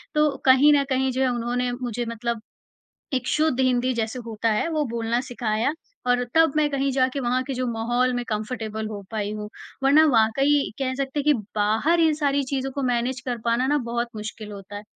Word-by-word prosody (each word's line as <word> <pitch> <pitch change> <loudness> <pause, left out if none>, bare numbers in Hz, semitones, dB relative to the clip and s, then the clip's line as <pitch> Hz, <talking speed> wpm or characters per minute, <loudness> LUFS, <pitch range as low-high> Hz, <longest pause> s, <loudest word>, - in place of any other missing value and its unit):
तो 300 0 +4 0.2
कहीं 270 +3 +7
न 285 -1 +4
कहीं 265 0 +1
जो 260 +1 -2
है 265 - +3
उन्होंने 245 +1 -1
मुझे 245 -1 -3
मतलब, 230 0 -3 0.7
एक 255 -1 -1
शुद्ध 310 -4 +1
हिंदी 255 0 +2
जैसे 225 +1 -2
होता 225 0 -1
है 215 - 0
वो 310 -2 0
बोलना 235 0 -1
सिखाया 235 0 -1 0.4
और 245 0 +3
तब 325 -2 +5
मैं 305 -1 +3
कहीं 275 0 0
जाके 260 +1 +1
वहाँ 250 0 0
के 270 - -4
जो 255 0 -2
माहौल 240 +3 +1
में 245 0 -2
कंफर्टेबल 220 0 -3
हो 210 -2 -6
पाई 210 -2 -2
हूँ। 210 0 -6 0.4
वरना 295 +3 +6
वाक़ई 275 +4 +3
कह 260 -1 -1
सकते 270 +1 -3
हैं - - -5
कि 300 - +5 0.2
बाहर 220 +12 +2
इन 320 -2 +4
सारी 285 -2 +1
चीज़ों 270 0 -2
को 280 - -3
मैनेज 245 0 0
कर 245 -2 -2
पाना 235 +2 +2
ना 295 +2 +2
बहुत 235 0 -1
मुश्किल 215 0 -7
होता 200 0 -9
है। 205 - -7
250 Hz, 205 wpm, -24 LUFS, 230-275 Hz, 0.7 s, कहीं